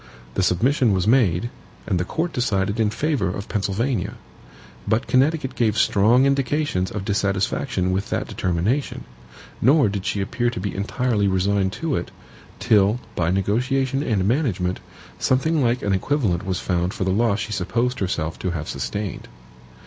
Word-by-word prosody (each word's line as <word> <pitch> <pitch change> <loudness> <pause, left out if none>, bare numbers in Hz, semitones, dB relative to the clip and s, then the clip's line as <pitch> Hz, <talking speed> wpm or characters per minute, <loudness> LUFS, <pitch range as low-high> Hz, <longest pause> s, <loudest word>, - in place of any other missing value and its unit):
The - - 0
submission 115 - +2
was 95 -1 0
made, 115 -3 +3 0.3
and 90 - 0
the - - +1
court 165 - -2
decided 105 -4 0
in 110 -2 +3
favor 145 -3 0
of 100 +3 -5
Pennsylvania. 110 +5 -1 0.7
But 110 +1 +1
Connecticut 140 +1 +1
gave 110 -3 +1
strong 110 +5 +4
indications 140 -7 0
of 100 -2 -5
dissatisfaction 100 0 0
with 95 +2 -2
that - - -2
determination; 90 - -1 0.6
nor 135 -1 +5
did 100 -1 -4
she 100 - -1
appear 120 +4 0
to 120 - -5
be 100 +2 -3
entirely 105 +1 0
resigned 95 0 +1
to 160 -4 -2
it, - - -4 0.5
till, 105 0 +3 0.2
by 85 -1 0
negotiation 125 +8 0
and 105 -10 0
management, 100 - 0 0.4
something 150 +4 +2
like 120 +1 +1
an 100 - +1
equivalent 95 - 0
was 95 -2 -1
found 90 0 -1
for - - -2
the 95 - 0
loss 110 +1 +2
she 110 - -4
supposed 115 +6 -1
herself 85 -4 -2
to 95 - -2
have 80 -3 -4
sustained. 100 -5 -4
105 Hz, 155 wpm, -22 LUFS, 95-125 Hz, 0.7 s, nor